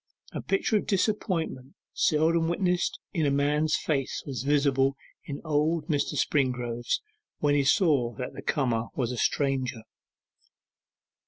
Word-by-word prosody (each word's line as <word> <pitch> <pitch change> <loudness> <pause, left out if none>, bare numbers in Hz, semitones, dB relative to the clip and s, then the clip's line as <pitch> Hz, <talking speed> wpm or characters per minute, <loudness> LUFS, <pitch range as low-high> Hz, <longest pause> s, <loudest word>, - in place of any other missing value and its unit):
A - - -4
picture 195 +2 +1
of - - -3
disappointment 180 - -1 0.2
seldom 165 +2 +2
witnessed 180 0 0
in 160 -6 +1
a - - +3
man's 145 +2 +2
face 135 -4 -1
was 130 -6 -4
visible 140 -1 +2 0.3
in 140 -1 -5
old 155 +1 0
Mr. 145 -3 0
Springrove's, 125 -4 0 0.3
when 145 -1 +2
he 145 -1 +3
saw 135 - +3
that 125 - -5
the - - -8
comer 120 -6 0
was 125 -2 -1
a 125 - -4
stranger. 130 -4 0
145 Hz, 135 wpm, -27 LUFS, 130-160 Hz, 0.3 s, a